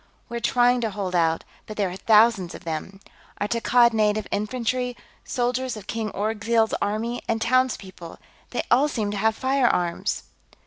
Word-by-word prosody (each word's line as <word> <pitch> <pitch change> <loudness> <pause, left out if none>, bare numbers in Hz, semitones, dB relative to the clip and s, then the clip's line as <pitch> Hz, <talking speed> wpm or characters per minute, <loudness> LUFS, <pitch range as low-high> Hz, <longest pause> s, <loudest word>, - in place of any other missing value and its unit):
We're 235 - -3
trying 245 +1 +3
to 225 - 0
hold 195 -3 -4
out, 165 -2 +2 0.2
but 215 - -8
there 195 -3 0
are - - -6
thousands 210 -3 +3
of - - -11
them. 170 +4 -5 0.4
Our 205 - 0
Takkad 235 +1 +3
Native 215 -1 +1
Infantry, 245 +3 -2 0.3
soldiers 250 0 -1
of 205 - -10
King 225 0 -3
Orgzild's 220 +2 0
army, 220 +4 -2
and 225 - 0
townspeople. 220 -8 -1 0.3
They 245 - -2
all 265 +5 +5
seem 220 -8 -2
to 205 - -3
have 220 +2 +2
firearms...." 245 -11 0
220 Hz, 160 wpm, -24 LUFS, 200-245 Hz, 0.4 s, all